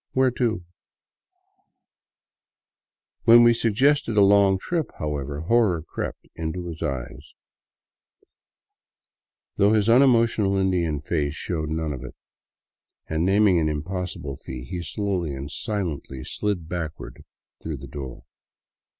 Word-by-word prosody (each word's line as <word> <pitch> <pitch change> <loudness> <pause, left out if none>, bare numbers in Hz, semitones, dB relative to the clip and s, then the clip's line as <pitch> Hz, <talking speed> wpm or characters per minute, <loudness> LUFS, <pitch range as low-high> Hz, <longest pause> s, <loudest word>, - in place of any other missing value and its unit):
Where 130 -1 +3
to? 115 -7 -1 1.3
" - - -62
When 120 +1 +8
we 120 0 +6
suggested 115 +2 +2
a 100 - +7
long 100 -1 +5
trip, 165 - -2
however, 75 -1 -3
horror 95 -3 +2
crept - - -6
into 80 +2 -4
his 80 -1 -8
eyes, 65 -3 -5 2.2
though 100 +2 +4
his 105 -1 +2
unemotional 115 -5 +4
Indian 85 -6 0
face 75 -2 -1
showed 80 -3 -3
none 80 -1 -2
of 65 - -7
it, - - -9 0.9
and 80 +1 -1
naming 95 -1 +4
an 80 -1 +1
impossible 75 -3 -4
fee, 65 -1 -8
he 90 +2 -5
slowly 85 -2 -2
and 70 +2 -7
silently 80 - -4
slid 100 -6 -3
backward 85 -3 -6 0.4
through - - -4
the - - -9
door. 65 -4 -8
90 Hz, 120 wpm, -24 LUFS, 75-105 Hz, 2.2 s, When